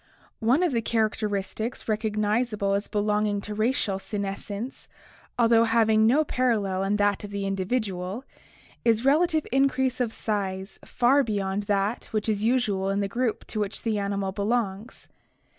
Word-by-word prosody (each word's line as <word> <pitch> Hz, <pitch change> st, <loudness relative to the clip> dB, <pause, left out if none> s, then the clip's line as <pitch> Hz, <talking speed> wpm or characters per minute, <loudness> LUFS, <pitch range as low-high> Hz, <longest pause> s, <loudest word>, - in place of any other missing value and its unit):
— -, -, -38 dB
One 315 Hz, +7 st, +3 dB
of 350 Hz, -, +2 dB
the 235 Hz, -3 st, 0 dB
characteristics 220 Hz, 0 st, -1 dB
recog 215 Hz, -1 st, -1 dB
nizable 215 Hz, -1 st, +1 dB
as 200 Hz, -, -2 dB
belonging 210 Hz, 0 st, 0 dB
to 210 Hz, -, -6 dB
racial 215 Hz, -3 st, 0 dB
senescence, 200 Hz, +4 st, -5 dB, 0.5 s
although 230 Hz, -1 st, +5 dB
having 220 Hz, -1 st, +4 dB
no 285 Hz, +7 st, +4 dB
parallel 215 Hz, -9 st, 0 dB
in 195 Hz, +1 st, +1 dB
that 205 Hz, 0 st, +1 dB
of 205 Hz, -, -6 dB
the 200 Hz, -1 st, -3 dB
individual, 195 Hz, +1 st, -2 dB, 0.6 s
is 230 Hz, +1 st, +2 dB
relative 315 Hz, +2 st, +3 dB
increase 265 Hz, -1 st, +2 dB
of 235 Hz, -3 st, 0 dB
size 195 Hz, -3 st, -3 dB
far 250 Hz, +3 st, +3 dB
beyond 200 Hz, -3 st, -1 dB
that 200 Hz, +3 st, 0 dB
which 215 Hz, 0 st, -3 dB
is 210 Hz, -1 st, 0 dB
usual 220 Hz, -5 st, +1 dB
in 200 Hz, +1 st, 0 dB
the 200 Hz, -, 0 dB
group 235 Hz, +2 st, -2 dB
to 215 Hz, -, -4 dB
which 205 Hz, 0 st, -3 dB
the 220 Hz, -3 st, 0 dB
animal 200 Hz, -1 st, -2 dB
be 200 Hz, +1 st, -5 dB
longs. 215 Hz, 0 st, -2 dB
215 Hz, 160 wpm, -26 LUFS, 200-235 Hz, 0.6 s, although